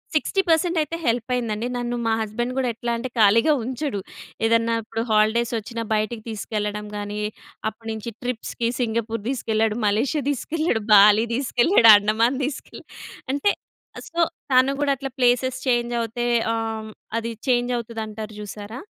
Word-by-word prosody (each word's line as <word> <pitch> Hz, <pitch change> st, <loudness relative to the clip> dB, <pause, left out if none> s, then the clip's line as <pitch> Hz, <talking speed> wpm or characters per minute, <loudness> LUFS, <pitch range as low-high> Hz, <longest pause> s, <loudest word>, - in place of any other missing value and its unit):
60 390 Hz, +5 st, +2 dB
పర్సెంటయితే 330 Hz, -1 st, +2 dB
హెల్పయిందండి. 235 Hz, -1 st, -1 dB
నన్ను 240 Hz, 0 st, -2 dB
మా 225 Hz, -, +2 dB
హస్బెండ్ 240 Hz, +4 st, -3 dB
గూడా 255 Hz, -2 st, +1 dB
ఎట్లా 235 Hz, +1 st, -3 dB
అంటే 255 Hz, +2 st, -4 dB
ఖాళీగా 230 Hz, +8 st, +5 dB
ఉంచడు. 255 Hz, -3 st, -3 dB, 0.5 s
ఏదన్నా 230 Hz, 0 st, +2 dB
ఇప్పుడు 225 Hz, +1 st, -4 dB
హాలిడేస్ 220 Hz, +2 st, +3 dB
వచ్చిన 230 Hz, +2 st, -5 dB
బయటికి 215 Hz, +1 st, -1 dB
తీసుకెళ్ళడం 210 Hz, -1 st, -3 dB
గాని, 205 Hz, 0 st, -4 dB, 0.5 s
అప్పటినుంచి 225 Hz, 0 st, -6 dB
ట్రిప్స్‌కి 240 Hz, -1 st, -3 dB
సింగపూర్ 230 Hz, -2 st, -1 dB
దీసుకెళ్ళాడు. 225 Hz, -3 st, 0 dB
మలేషియా 245 Hz, +9 st, +1 dB
దీసుకెళ్ళాడు. 290 Hz, -4 st, -1 dB
బాలి 210 Hz, +3 st, +7 dB
దీసుకెళ్ళాడు. 245 Hz, -, +4 dB
అండమాన్ 225 Hz, +5 st, +1 dB
దీసుకెళ్ళా. 280 Hz, -1 st, -7 dB, 0.5 s
అంటే 345 Hz, +9 st, +2 dB, 0.5 s
ఆహ్, -, -, -8 dB
సో 335 Hz, -, -5 dB, 0.3 s
తను 260 Hz, +1 st, +5 dB
గూడా 285 Hz, -1 st, +2 dB
అట్లా 270 Hz, +1 st, -5 dB
ప్లేసేస్ 250 Hz, +1 st, +2 dB
చేంజవుతే 240 Hz, -1 st, 0 dB, 0.3 s
ఆహ్, 220 Hz, -1 st, -3 dB, 0.3 s
అది 230 Hz, 0 st, -2 dB, 0.2 s
చేంజవుతది 240 Hz, -2 st, 0 dB
అంటారు 215 Hz, 0 st, -7 dB
జూసారా! 210 Hz, +3 st, -7 dB
230 Hz, 130 wpm, -23 LUFS, 220-250 Hz, 0.5 s, బాలి